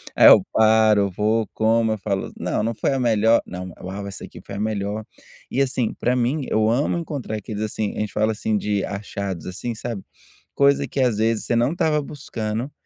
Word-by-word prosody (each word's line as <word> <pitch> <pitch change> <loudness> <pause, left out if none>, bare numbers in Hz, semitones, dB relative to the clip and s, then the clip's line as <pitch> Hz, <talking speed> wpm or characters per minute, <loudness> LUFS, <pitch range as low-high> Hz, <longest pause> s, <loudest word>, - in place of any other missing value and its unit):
aí, - - +8
eu - - +9
paro, 110 -2 +4
vou, 110 +3 +1
como, 110 0 +2
eu - - -3
falo: 100 -1 -3
"Não, - - -1
não 115 +1 0
foi 135 - 0
a 135 - 0
melhor, 115 -1 +3
não, 90 -1 -7
uau, 100 +2 -5
essa 100 - -8
aqui - - -10
foi - - -7
a - - -4
melhor.". 105 0 -2 0.5
E, 135 - +1
assim, 125 -3 0
para 125 +1 0
mim, 125 +4 0
eu 110 0 +2
amo 140 +8 +1
encontrar 145 -9 -4
aqueles, 105 0 -6
assim, 110 -1 -3
a - - -3
gente 105 -3 -3
fala, 110 +1 +2
assim, 110 0 -1
de 105 -1 -1
achados, 100 -4 -5
assim, 115 +6 -4
sabe, 115 -3 -5 0.5
coisa 140 0 +3
que, 140 - -4
às 120 -5 +2
vezes, 110 0 +1
você 120 - 0
não 120 +7 +2
estava 155 -3 +1
buscando 125 -3 -4
110 Hz, 205 wpm, -22 LUFS, 105-120 Hz, 0.5 s, eu